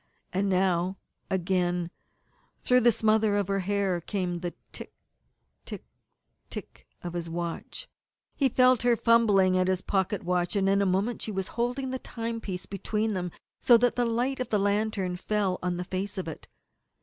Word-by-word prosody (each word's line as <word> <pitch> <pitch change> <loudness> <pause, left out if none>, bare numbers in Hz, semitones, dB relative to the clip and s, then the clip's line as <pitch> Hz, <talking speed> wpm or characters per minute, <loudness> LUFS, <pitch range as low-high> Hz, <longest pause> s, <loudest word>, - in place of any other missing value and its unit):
And 195 +2 +1
now, 185 0 +1 0.3
again 180 -2 0 0.4
up - - -39
through 250 0 +5
the 240 -1 +5
smother 215 -1 +2
of 205 -2 +1
her 195 0 +1
hair, 195 -2 0
came 180 -2 -2
the 175 0 -5 0.2
tick - - -10 0.7
tick - - -8 0.6
tick - - -9 0.2
of 175 -1 -5
his 170 -1 -4
watch. 170 0 -5 0.5
He 275 -2 +2
felt 255 0 +4
her 245 0 +4
fumbling 210 -6 +4
at 185 0 +2
his 185 -1 +1
watch - - -33 0.2
pocket, 205 - -4 0.3
and 195 -1 +2
in 200 0 +3
a 200 - +2
moment 195 +6 0
she 220 - -3
was 190 -2 -3
holding 250 +3 -2
the 260 - -3
timepiece 230 -7 -5
between 210 +2 -2
them, 180 -2 -2 0.3
so 240 - +7
that 245 +1 +2
the 245 - +2
light 245 +4 0
of 255 - -3
the 210 - +2
lantern 200 -2 0
fell 195 -1 0
on 180 -1 -1
the 180 - -2
face 190 +2 -4
of 185 - -3
it. 160 - -8
200 Hz, 175 wpm, -28 LUFS, 180-230 Hz, 0.7 s, so